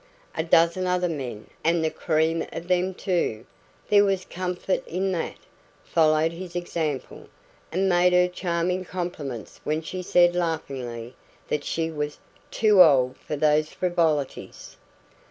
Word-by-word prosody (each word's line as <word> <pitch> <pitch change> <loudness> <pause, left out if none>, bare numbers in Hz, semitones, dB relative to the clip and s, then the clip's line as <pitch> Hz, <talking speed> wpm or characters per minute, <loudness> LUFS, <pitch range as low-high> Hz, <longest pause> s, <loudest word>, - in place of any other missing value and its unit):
A - - 0
dozen 170 +2 +3
other 180 0 +1
men, 130 -10 -5 0.2
and 165 0 +2
the 160 - 0
cream 160 0 0
of 170 +1 -7
them 180 +1 +1
too 165 - -1 0.4
there 205 -1 +6
was 195 -2 0
comfort 180 +1 -2
in 190 +3 -1
that 170 -3 -3 0.5
followed 155 0 +3
his 175 +1 -8
example, 160 -5 -3 0.4
and 190 +4 +1
made 180 0 +4
her 180 0 +4
charming 180 0 -1
compliments 170 - -6
when 155 +1 -1
she 185 +3 -5
said 175 -1 +4
laughingly 130 -8 -3 0.4
that 150 - -1
she 165 0 -2
was 150 -1 -4 0.3
"too 210 -4 +5
old 130 -6 +5
for 150 - -6
these 150 +1 +2
frivolities". 165 -6 -1
170 Hz, 135 wpm, -25 LUFS, 155-180 Hz, 0.5 s, there